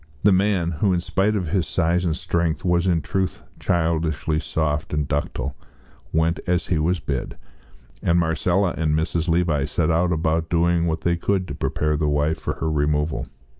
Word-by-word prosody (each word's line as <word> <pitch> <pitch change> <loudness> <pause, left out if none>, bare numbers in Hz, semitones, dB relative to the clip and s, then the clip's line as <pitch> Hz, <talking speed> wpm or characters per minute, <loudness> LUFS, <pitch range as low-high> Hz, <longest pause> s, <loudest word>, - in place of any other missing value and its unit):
The 105 - +6
man, 95 -3 +2
who 90 +4 +1
in 90 - +1
spite 95 +4 0
of 90 -6 -2
his 90 -2 0
size 85 +6 +1
and 80 -1 0
strength 85 0 -1
was 85 0 +2
in 85 -4 +2
truth 95 +7 -2 0.2
childishly 80 -2 0
soft 80 -2 -2
and 75 -2 -1
ductile, 70 -2 -2 0.6
went 80 +1 +1
as 90 0 +1
he 85 - 0
was 85 +3 +1
bid, 70 -3 -4 0.6
and 85 - +2
Marcella 85 +2 +1
and 75 -2 +1
Mrs. 80 +1 -1
Levi 80 -4 +2
set 80 +2 0
about 80 -1 +1
doing 85 0 +2
what 80 0 -1
they 85 0 +1
could 95 +1 0
to - - -3
prepare 75 +2 -1
the 75 0 +1
wife 75 +2 +1
for - - -3
her 80 - -2
removal. 75 +1 0
80 Hz, 175 wpm, -23 LUFS, 75-85 Hz, 0.6 s, The